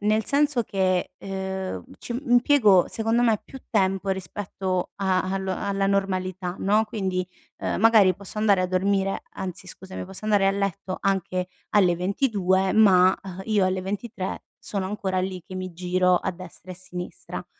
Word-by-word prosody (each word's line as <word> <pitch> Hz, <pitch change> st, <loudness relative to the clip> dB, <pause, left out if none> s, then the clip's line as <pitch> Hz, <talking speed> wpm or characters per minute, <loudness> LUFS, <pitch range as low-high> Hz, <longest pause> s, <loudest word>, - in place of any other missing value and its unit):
nel 215 Hz, +1 st, +2 dB
senso 285 Hz, -4 st, +2 dB
che, 185 Hz, -3 st, 0 dB
ehm, 190 Hz, 0 st, -4 dB
ci 240 Hz, +1 st, -5 dB
impiego 240 Hz, -7 st, +5 dB
secondo 225 Hz, +2 st, +1 dB
me 225 Hz, -3 st, +3 dB
più 265 Hz, -, -11 dB
tempo 195 Hz, -2 st, +1 dB
rispetto 190 Hz, 0 st, -3 dB
a 190 Hz, -2 st, +1 dB
allo 190 Hz, -1 st, -2 dB
alla 195 Hz, -1 st, -1 dB
normalità, 185 Hz, -2 st, -1 dB
no, 210 Hz, +3 st, +3 dB
quindi, 190 Hz, -4 st, -2 dB, 0.3 s
uhm, -, -, -2 dB
magari 215 Hz, -3 st, +6 dB
posso 200 Hz, +2 st, -6 dB
andare 205 Hz, -3 st, +4 dB
a -, -, +1 dB
dormire 195 Hz, +1 st, 0 dB
anzi 185 Hz, 0 st, -6 dB
scusami 190 Hz, 0 st, -7 dB
posso 190 Hz, +3 st, -10 dB
andare 205 Hz, -2 st, +3 dB
a -, -, +4 dB
letto 195 Hz, -1 st, -2 dB
anche 185 Hz, -2 st, 0 dB, 0.3 s
alle 185 Hz, -4 st, +5 dB
22 190 Hz, 0 st, +1 dB
ma, 190 Hz, -4 st, +6 dB
uhm, 190 Hz, -1 st, -8 dB
io 210 Hz, -3 st, +2 dB
alle 185 Hz, 0 st, 0 dB
23 200 Hz, 0 st, -4 dB, 0.2 s
sono 195 Hz, -2 st, -3 dB
ancora 190 Hz, -2 st, -2 dB
lì, 185 Hz, -1 st, -4 dB
che 185 Hz, -, -9 dB
mi 185 Hz, -1 st, -5 dB
giro 180 Hz, +1 st, +2 dB
a -, -, -1 dB
destra 185 Hz, 0 st, -11 dB
e -, -, -9 dB
sinistra. 180 Hz, -1 st, -8 dB
190 Hz, 160 wpm, -25 LUFS, 185-205 Hz, 0.3 s, magari